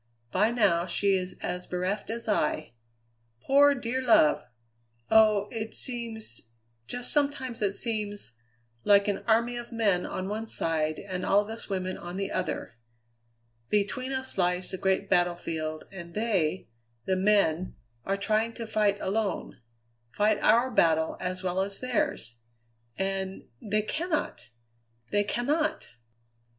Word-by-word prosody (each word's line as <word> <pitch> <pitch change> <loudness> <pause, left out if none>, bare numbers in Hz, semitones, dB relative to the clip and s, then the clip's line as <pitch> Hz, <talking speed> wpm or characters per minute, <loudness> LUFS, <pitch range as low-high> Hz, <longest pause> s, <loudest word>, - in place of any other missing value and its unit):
By 210 - +3
now 195 -7 +2
she 195 +3 +2
is 185 -1 -2
as 180 0 -3
bereft 185 +4 -2
as 230 +1 -4
I; 155 - 0 0.7
poor, 280 - +5
dear 250 0 -2
love! 230 -11 +5 0.7
Oh! 215 -2 +5
it 220 -1 -5
seems, 225 - -4 0.4
just 245 - -2
sometimes 280 -5 0
it 200 -1 +1
seems, 210 - -3 0.5
like 200 0 +5
an 205 - 0
army 235 +2 +3
of 240 0 -7
men 205 -6 +1
on 185 - -4
one 220 +2 -3
side 155 -5 0
and 185 -2 -5
all 200 - +4
of 210 +1 -7
us 225 - -8
women 185 -1 -2
on 175 +1 -7
the 195 0 -2
other. 115 - -3 0.9
Between 210 +6 0
us 260 -5 -3
lies 180 0 +1
the 190 - -3
great 190 0 +1
battlefield, 165 -3 0
and 170 -3 -9
they, 190 -6 0 0.4
the 190 - +1
men, 185 -3 +2 0.3
are 195 +7 -1
trying 220 +3 +1
to 230 - -6
fight 210 -2 +1
alone 200 - -2 0.5
fight 210 - +2
our 235 +4 +4
battle 160 -6 +3
as 185 +1 -4
well 185 0 0
as 195 0 -3
theirs. 165 - -1 0.6
And 195 0 -2 0.2
they 210 0 0
cannot! 310 - -2 0.6
they 205 0 +3
cannot!" 285 +9 -1
205 Hz, 140 wpm, -28 LUFS, 185-230 Hz, 0.9 s, poor